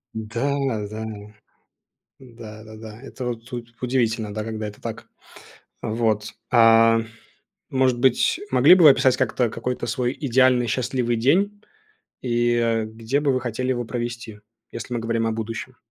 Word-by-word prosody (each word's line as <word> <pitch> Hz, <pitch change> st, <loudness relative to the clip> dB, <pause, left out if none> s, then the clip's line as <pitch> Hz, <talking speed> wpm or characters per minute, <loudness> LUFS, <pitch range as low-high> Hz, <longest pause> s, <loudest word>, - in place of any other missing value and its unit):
Н-да, 120 Hz, +3 st, -2 dB
да. 110 Hz, +1 st, -6 dB, 1.1 s
Да 115 Hz, -4 st, -12 dB
да 110 Hz, 0 st, -12 dB
да. 110 Hz, 0 st, -11 dB
Это 135 Hz, -2 st, -7 dB
вот 120 Hz, +1 st, -6 dB
у 120 Hz, -1 st, -4 dB, 0.2 s
удивительно, 115 Hz, -4 st, 0 dB
да, 105 Hz, +1 st, -4 dB
когда 110 Hz, -1 st, -4 dB
это 105 Hz, 0 st, -9 dB
так. -, -, -7 dB, 0.8 s
Вот. 110 Hz, -1 st, -1 dB, 0.2 s
А, 115 Hz, -1 st, +6 dB, 0.7 s
может 130 Hz, -3 st, +2 dB
быть, 130 Hz, -, +2 dB
могли -, -, +7 dB
бы 180 Hz, -2 st, +4 dB
вы 150 Hz, -, +11 dB
описать 130 Hz, -1 st, +3 dB
как-то 125 Hz, -2 st, 0 dB
какой-то 125 Hz, +3 st, -4 dB
свой 125 Hz, +2 st, -2 dB
идеальный 130 Hz, -2 st, +3 dB
счастливый 125 Hz, +1 st, -1 dB
день? 195 Hz, -, +1 dB, 0.6 s
И, 120 Hz, -1 st, +1 dB
э, 115 Hz, -2 st, +1 dB
где 115 Hz, +5 st, -2 dB
бы 145 Hz, -2 st, +2 dB
вы 130 Hz, -, +1 dB
хотели 125 Hz, +1 st, -3 dB
его 120 Hz, -2 st, -1 dB
провести? 120 Hz, -2 st, -5 dB, 0.3 s
Если 115 Hz, +1 st, -6 dB
мы 120 Hz, -, -1 dB
говорим 115 Hz, 0 st, -1 dB
о -, -, 0 dB
будущем. 115 Hz, +3 st, -5 dB
120 Hz, 150 wpm, -23 LUFS, 110-130 Hz, 1.1 s, вы